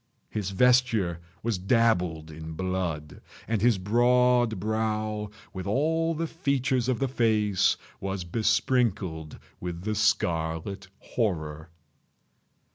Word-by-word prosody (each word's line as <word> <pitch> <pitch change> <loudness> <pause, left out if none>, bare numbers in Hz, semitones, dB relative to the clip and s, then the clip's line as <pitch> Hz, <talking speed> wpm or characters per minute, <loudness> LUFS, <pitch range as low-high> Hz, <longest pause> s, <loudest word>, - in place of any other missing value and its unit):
His 105 -3 -2
vesture 115 -5 +3 0.2
was 115 -4 -1
dabbled 90 -7 +1
in 80 +1 -8
blood—and 90 +3 -4
his 120 -2 +4
broad 120 +2 +3
brow, 110 0 -1 0.2
with 95 0 -5
all 160 +8 +1
the 165 +2 -1
features 130 -6 0
of 125 - +1
the 135 - 0
face, 110 -6 +2 0.2
was 95 -1 -3
besprinkled 95 - 0 0.2
with 90 0 -5
the 110 +1 -1
scarlet 95 -3 0
horror. 80 -8 -3
105 Hz, 105 wpm, -27 LUFS, 90-120 Hz, 0.2 s, his